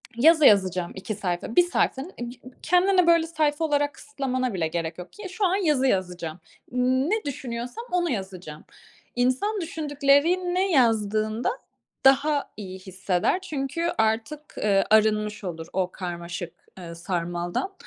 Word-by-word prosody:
yazı 310 Hz, +5 st, +5 dB
yazacağım 185 Hz, -5 st, +4 dB
2 195 Hz, +3 st, -5 dB
sayfa, 190 Hz, +2 st, -3 dB
1 -, -, +8 dB
sayfa. 345 Hz, -6 st, 0 dB, 0.2 s
Ig 240 Hz, 0 st, -5 dB
ıg 255 Hz, -, -12 dB
kendine 360 Hz, 0 st, +3 dB
böyle 335 Hz, -1 st, +4 dB
sayfa 310 Hz, -1 st, 0 dB
olarak 290 Hz, -1 st, +1 dB
kısıtlamana 255 Hz, -4 st, -3 dB
bile 170 Hz, -4 st, 0 dB
gerek 165 Hz, 0 st, -4 dB
yok 180 Hz, 0 st, -10 dB
ki 415 Hz, -2 st, -8 dB
şu 385 Hz, +2 st, -1 dB
an 370 Hz, 0 st, +2 dB
yazı 300 Hz, -9 st, +2 dB
yazacağım. 180 Hz, -5 st, -2 dB, 0.3 s
Ne 260 Hz, -, +1 dB
düşünüyorsam 250 Hz, -, -5 dB
onu 350 Hz, -1 st, +1 dB
yazacağım. 185 Hz, -7 st, -6 dB, 0.5 s
İnsan 255 Hz, -, +1 dB
düşündüklerini 330 Hz, +4 st, +1 dB
yazdığında 220 Hz, -4 st, +2 dB, 0.6 s
daha 280 Hz, +2 st, +4 dB
iyi 190 Hz, -3 st, -7 dB
hisseder. 185 Hz, -, -1 dB
Çünkü 335 Hz, 0 st, -2 dB
artık, 225 Hz, +7 st, -1 dB
eee, 200 Hz, -2 st, +2 dB
arınmış 215 Hz, -1 st, +2 dB
olur 165 Hz, -2 st, -5 dB
o 185 Hz, -1 st, 0 dB
karmaşık, 175 Hz, -1 st, -6 dB, 0.3 s
eee, 170 Hz, -2 st, -8 dB
sarmaldan. 175 Hz, -, -3 dB
245 Hz, 135 wpm, -25 LUFS, 185-310 Hz, 0.6 s, 1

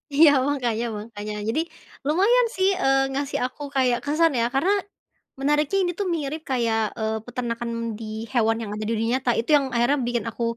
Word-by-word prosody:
Iya 310 Hz, 0 st, +8 dB, 0.2 s
mangkanya 240 Hz, -5 st, 0 dB
mangkanya. 210 Hz, 0 st, -6 dB, 0.2 s
Jadi, 270 Hz, +8 st, +1 dB, 0.5 s
lumayan, 435 Hz, +10 st, +4 dB
sih, 380 Hz, +1 st, +3 dB
eee, 270 Hz, 0 st, +3 dB
ngasih 280 Hz, +1 st, -2 dB
aku 255 Hz, +3 st, -7 dB
kayak 255 Hz, -2 st, +3 dB
kesan, 315 Hz, +2 st, +3 dB
ya, 230 Hz, -, +2 dB
karena 345 Hz, +9 st, +3 dB, 0.7 s
menariknya 295 Hz, +6 st, +1 dB
ini 355 Hz, -, 0 dB
tuh 400 Hz, -, 0 dB
mirip 305 Hz, 0 st, -4 dB
kayak, 230 Hz, -3 st, +1 dB, 0.2 s
eee, 220 Hz, 0 st, -1 dB
peternakan 240 Hz, -1 st, -4 dB, 0.3 s
di 225 Hz, -, -6 dB, 0.3 s
hewan 225 Hz, -2 st, +2 dB
yang 210 Hz, -2 st, -5 dB
ada 215 Hz, -, -4 dB
di 225 Hz, -, -2 dB
dunia 225 Hz, +1 st, 0 dB
nyata. 250 Hz, -2 st, +1 dB
Itu 230 Hz, -, -3 dB
yang 275 Hz, -, 0 dB
akhirnya 240 Hz, +5 st, +3 dB
bikin 240 Hz, -1 st, -1 dB
aku 235 Hz, +1 st, -5 dB
255 Hz, 180 wpm, -24 LUFS, 230-295 Hz, 0.7 s, Iya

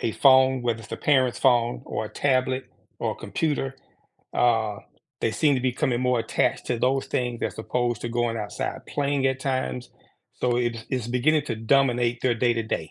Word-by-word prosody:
a 110 Hz, -, -1 dB
phone, 130 Hz, -1 st, +5 dB
whether 120 Hz, -2 st, -1 dB
it's 110 Hz, -, -12 dB
a -, -, -2 dB
parent's 130 Hz, -4 st, +2 dB
phone 120 Hz, -, +3 dB
or -, -, -3 dB
a -, -, -6 dB
tablet 130 Hz, -1 st, +1 dB, 0.3 s
or -, -, -1 dB
a -, -, -11 dB
computer, 140 Hz, -4 st, -2 dB, 0.6 s
uh, 110 Hz, -3 st, +2 dB, 0.4 s
they 115 Hz, -, +1 dB
seem 145 Hz, +3 st, +2 dB
to 130 Hz, -, 0 dB
becoming 125 Hz, -1 st, 0 dB
more 125 Hz, -1 st, +2 dB
attached 115 Hz, -, 0 dB
to 120 Hz, -2 st, -1 dB
those 135 Hz, +2 st, +1 dB
things 120 Hz, -2 st, -2 dB
as -, -, -3 dB
opposed 120 Hz, 0 st, -1 dB
to 120 Hz, -, -2 dB
going 120 Hz, -1 st, -1 dB
outside 105 Hz, -2 st, -4 dB
playing 140 Hz, -1 st, 0 dB
at 130 Hz, 0 st, 0 dB
times, 130 Hz, -2 st, -2 dB, 0.5 s
so 125 Hz, -1 st, +1 dB
it's, 120 Hz, -2 st, -1 dB
it's 125 Hz, -3 st, -2 dB
beginning 145 Hz, +5 st, +2 dB
to 115 Hz, -, -3 dB
dominate 120 Hz, 0 st, +2 dB
their 125 Hz, -1 st, +2 dB
day 120 Hz, +1 st, +2 dB
to 115 Hz, -1 st, -1 dB
day. 80 Hz, -8 st, -4 dB
125 Hz, 190 wpm, -25 LUFS, 115-130 Hz, 0.6 s, phone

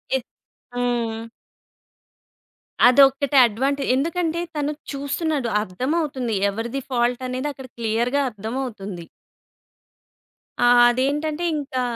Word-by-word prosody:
ఎ 265 Hz, -, 0 dB, 0.5 s
హ్మ్. 235 Hz, -2 st, -1 dB, 1.6 s
అదొక్కటే 275 Hz, +1 st, +5 dB
అడ్వాంటే 270 Hz, +5 st, -1 dB
ఎందుకంటే 335 Hz, +4 st, -1 dB
తను 295 Hz, 0 st, -1 dB, 0.2 s
చూస్తున్నాడు 280 Hz, -2 st, -2 dB
అర్థమవుతుంది. 260 Hz, -, -2 dB, 0.2 s
ఎవరిది 235 Hz, +6 st, -4 dB
ఫాల్టనేదక్కడ 255 Hz, +2 st, -2 dB
క్లియర్‌గా 235 Hz, +4 st, 0 dB
అర్థమవుతుంది. 210 Hz, -5 st, -6 dB, 1.6 s
ఆహ్, 245 Hz, 0 st, +6 dB
అదేంటంటే 295 Hz, +6 st, -1 dB
ఇంకా 275 Hz, -3 st, -3 dB
260 Hz, 75 wpm, -22 LUFS, 235-285 Hz, 1.6 s, ఆహ్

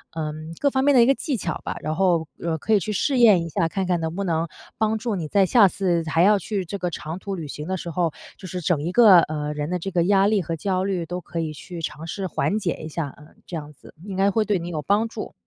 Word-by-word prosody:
嗯， 155 Hz, 0 st, -5 dB
各 285 Hz, -, +3 dB
方 265 Hz, -1 st, 0 dB
面 285 Hz, +1 st, +4 dB
的 245 Hz, -, +7 dB
一 -, -, +6 dB
个 270 Hz, -, +5 dB
技 275 Hz, -2 st, -2 dB
巧 170 Hz, -5 st, -4 dB
吧， -, -, -4 dB
然 155 Hz, +1 st, -2 dB
后， 170 Hz, -3 st, +2 dB, 0.2 s
呃， 165 Hz, -1 st, -1 dB
可 220 Hz, +8 st, 0 dB
以 210 Hz, -, +5 dB
去 215 Hz, -, -3 dB
试 260 Hz, +7 st, 0 dB
验 210 Hz, -8 st, +6 dB
一 -, -, -6 dB
下， 165 Hz, +1 st, 0 dB
看 190 Hz, +1 st, -2 dB
看 180 Hz, -1 st, +1 dB
能 160 Hz, +1 st, -3 dB
不 200 Hz, -, -1 dB
能 165 Hz, -1 st, 0 dB, 0.3 s
帮 220 Hz, 0 st, +1 dB
助 220 Hz, -1 st, -2 dB
你 165 Hz, -5 st, -3 dB
在 195 Hz, +3 st, +4 dB
下 205 Hz, +1 st, +6 dB
次 175 Hz, -3 st, 0 dB
还 165 Hz, +2 st, +3 dB
要 205 Hz, +1 st, +5 dB
去 195 Hz, 0 st, -3 dB
这 200 Hz, +4 st, -5 dB
个 180 Hz, -2 st, -2 dB
长 160 Hz, +1 st, -6 dB
途 195 Hz, 0 st, -4 dB
旅 165 Hz, -4 st, -6 dB
行 150 Hz, +2 st, -7 dB
的 190 Hz, -, -1 dB
时 175 Hz, -, -6 dB
候， 170 Hz, 0 st, 0 dB, 0.3 s
就 190 Hz, -, -9 dB
是 180 Hz, +1 st, -4 dB
整 165 Hz, -3 st, 0 dB
一 170 Hz, -, -2 dB
个， 205 Hz, -4 st, +8 dB
呃， 150 Hz, -1 st, -3 dB
人 150 Hz, 0 st, -3 dB
的 180 Hz, 0 st, -1 dB
这 195 Hz, +3 st, -4 dB
个 175 Hz, -2 st, +2 dB
压 195 Hz, +2 st, +4 dB
力 210 Hz, -1 st, +2 dB
和 165 Hz, -1 st, -3 dB
焦 185 Hz, +2 st, -1 dB
虑 190 Hz, -3 st, -1 dB
都 180 Hz, +2 st, -5 dB
可 170 Hz, -, -6 dB
以 160 Hz, -2 st, -2 dB
去 170 Hz, +3 st, -8 dB
尝 155 Hz, 0 st, -5 dB
试 190 Hz, +3 st, -3 dB
缓 200 Hz, +4 st, 0 dB
解 185 Hz, -5 st, -2 dB
一 -, -, -5 dB
下， 150 Hz, -3 st, -4 dB
嗯， 150 Hz, +1 st, -17 dB
这 175 Hz, -, -7 dB
样 150 Hz, -2 st, -6 dB
子， 145 Hz, -, -17 dB
应 195 Hz, -1 st, -6 dB
该 195 Hz, +1 st, +4 dB
会 220 Hz, +2 st, +2 dB
对 205 Hz, -3 st, +1 dB
你 170 Hz, -, -6 dB
有 155 Hz, -3 st, -3 dB
帮 205 Hz, +9 st, +2 dB
助。 225 Hz, -, -7 dB
180 Hz, 310 characters per minute, -23 LUFS, 160-200 Hz, 0.3 s, 个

